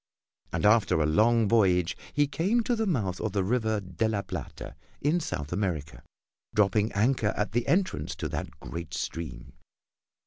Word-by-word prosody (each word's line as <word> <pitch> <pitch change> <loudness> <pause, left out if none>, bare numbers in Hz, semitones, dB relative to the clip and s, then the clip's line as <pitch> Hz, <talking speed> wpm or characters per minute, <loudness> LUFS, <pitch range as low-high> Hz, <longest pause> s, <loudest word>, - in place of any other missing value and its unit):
And - - -1
after 105 -6 +4
a 75 - +2
long 110 +8 +3
voyage 95 -5 +3 0.2
he 145 - +3
came 180 +12 +1
to 245 +1 +1
the 220 -1 -1
mouth 105 - -1
of 110 - -2
the 100 -2 +1
River 110 0 +1
de 100 +3 -2
la 100 -2 -1
Plata - - -7 0.2
in 155 +5 +2
South 90 - -4
America, 85 -7 -2 0.5
dropping 105 +1 +3
anchor 110 +1 +1
at 105 -1 -1
the 120 +2 0
entrance 185 0 0
to - - -3
that - - -4
great 85 -2 -6
stream. 65 -6 -5
105 Hz, 165 wpm, -28 LUFS, 90-125 Hz, 0.5 s, after